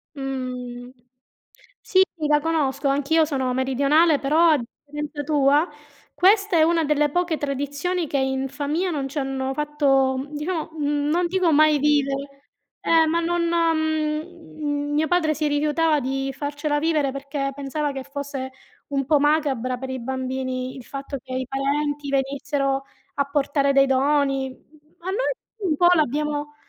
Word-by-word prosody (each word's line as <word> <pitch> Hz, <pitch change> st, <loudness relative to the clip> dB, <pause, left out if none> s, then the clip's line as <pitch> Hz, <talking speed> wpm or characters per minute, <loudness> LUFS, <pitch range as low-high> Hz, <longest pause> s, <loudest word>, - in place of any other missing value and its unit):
Mh. 250 Hz, -2 st, -5 dB, 0.9 s
Sì, 375 Hz, 0 st, +3 dB, 0.3 s
la 295 Hz, 0 st, +4 dB
conosco. 295 Hz, -3 st, 0 dB
Anch'io 290 Hz, +4 st, +2 dB
sono 265 Hz, -4 st, -1 dB
meridionale, 280 Hz, +4 st, +3 dB
però, 315 Hz, +5 st, +4 dB
a 300 Hz, -, +4 dB
differenza 295 Hz, +4 st, -7 dB
tua, 290 Hz, +2 st, +3 dB, 0.5 s
questa 395 Hz, -1 st, +4 dB
è 315 Hz, -, +6 dB
una 330 Hz, 0 st, +3 dB
delle 295 Hz, 0 st, +2 dB
poche 350 Hz, 0 st, 0 dB
tradizioni 285 Hz, +5 st, -2 dB
che 280 Hz, -, -1 dB
in 265 Hz, 0 st, 0 dB
famiglia 295 Hz, +6 st, -2 dB
non 280 Hz, -3 st, -2 dB
ci 290 Hz, -, -3 dB
hanno 270 Hz, 0 st, -2 dB
fatto, 275 Hz, -2 st, +1 dB
diciamo 315 Hz, +2 st, -3 dB
mhmm, 290 Hz, -1 st, -1 dB
non 350 Hz, +3 st, +2 dB
dico 365 Hz, -2 st, +1 dB
mai 305 Hz, 0 st, +5 dB
vivere 275 Hz, -1 st, 0 dB, 0.4 s
eh, 325 Hz, -1 st, +4 dB
ma 335 Hz, +2 st, +1 dB
non 340 Hz, 0 st, 0 dB
mhmm, 315 Hz, -2 st, -1 dB
mio 310 Hz, +1 st, +1 dB
padre 330 Hz, -3 st, +2 dB
si 305 Hz, 0 st, -1 dB
rifiutava 300 Hz, +1 st, +2 dB
di 270 Hz, +1 st, -2 dB
farcela 290 Hz, +1 st, -2 dB
vivere, 305 Hz, -4 st, +1 dB
perché 275 Hz, 0 st, -3 dB
pensava 285 Hz, +1 st, -2 dB
che 270 Hz, -1 st, -6 dB
fosse 280 Hz, -1 st, -5 dB, 0.4 s
un 275 Hz, -2 st, -1 dB
po' 300 Hz, 0 st, +3 dB
macabra 280 Hz, -4 st, +1 dB
per 265 Hz, +1 st, -6 dB
i 260 Hz, -1 st, -4 dB
bambini 260 Hz, 0 st, -3 dB
il 260 Hz, -, -9 dB
fatto 275 Hz, 0 st, -6 dB
che 260 Hz, -1 st, -8 dB
i 255 Hz, -1 st, -2 dB
parenti 285 Hz, +2 st, -1 dB
venissero 275 Hz, 0 st, -1 dB, 0.3 s
a 280 Hz, -, +1 dB
portare 280 Hz, 0 st, +1 dB
dei 275 Hz, 0 st, +5 dB
doni. 270 Hz, 0 st, +1 dB, 0.5 s
Ma 360 Hz, +2 st, -6 dB
noi 425 Hz, +6 st, 0 dB, 0.4 s
un 305 Hz, -, +2 dB
po' 350 Hz, -, +5 dB
l'abbiamo, 295 Hz, 0 st, -1 dB
290 Hz, 150 wpm, -23 LUFS, 270-310 Hz, 0.9 s, è